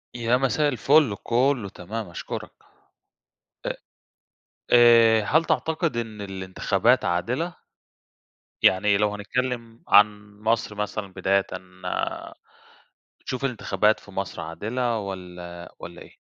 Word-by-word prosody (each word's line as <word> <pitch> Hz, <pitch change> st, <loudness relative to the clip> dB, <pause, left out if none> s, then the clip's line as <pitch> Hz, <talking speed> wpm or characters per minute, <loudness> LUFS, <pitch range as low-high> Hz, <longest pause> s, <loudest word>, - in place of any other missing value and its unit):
يا 120 Hz, +1 st, +2 dB
مساء 140 Hz, +3 st, +1 dB
الفل. 140 Hz, -2 st, +3 dB
كله 125 Hz, -3 st, +1 dB
تمام، 105 Hz, +2 st, -6 dB
أشكُرك. 85 Hz, -, -6 dB, 1.2 s
أ -, -, 0 dB, 1.0 s
آآ 115 Hz, -2 st, +7 dB
هل 160 Hz, +10 st, +2 dB
تعتقد 160 Hz, -5 st, 0 dB
إن 110 Hz, -3 st, -4 dB
الانتخابات 95 Hz, +4 st, 0 dB
عادلة؟ 125 Hz, -, -1 dB, 1.1 s
يعني 100 Hz, +2 st, +4 dB
لو 105 Hz, 0 st, +1 dB
هنتكلّم 115 Hz, +2 st, -3 dB
عن 105 Hz, 0 st, +4 dB
مصر 110 Hz, 0 st, 0 dB
مثلًا 105 Hz, -1 st, -4 dB
بدايةً، 95 Hz, +1 st, +1 dB, 1.7 s
بتشوف 130 Hz, +1 st, -5 dB
الانتخابات 110 Hz, -4 st, +1 dB
في 100 Hz, -, -15 dB
مصر 95 Hz, -1 st, -4 dB
عادلة، 115 Hz, +8 st, -2 dB
والّا 90 Hz, -3 st, -8 dB
والّا -, -, -10 dB
إيه؟ -, -, -17 dB
110 Hz, 105 wpm, -25 LUFS, 100-125 Hz, 1.7 s, آآ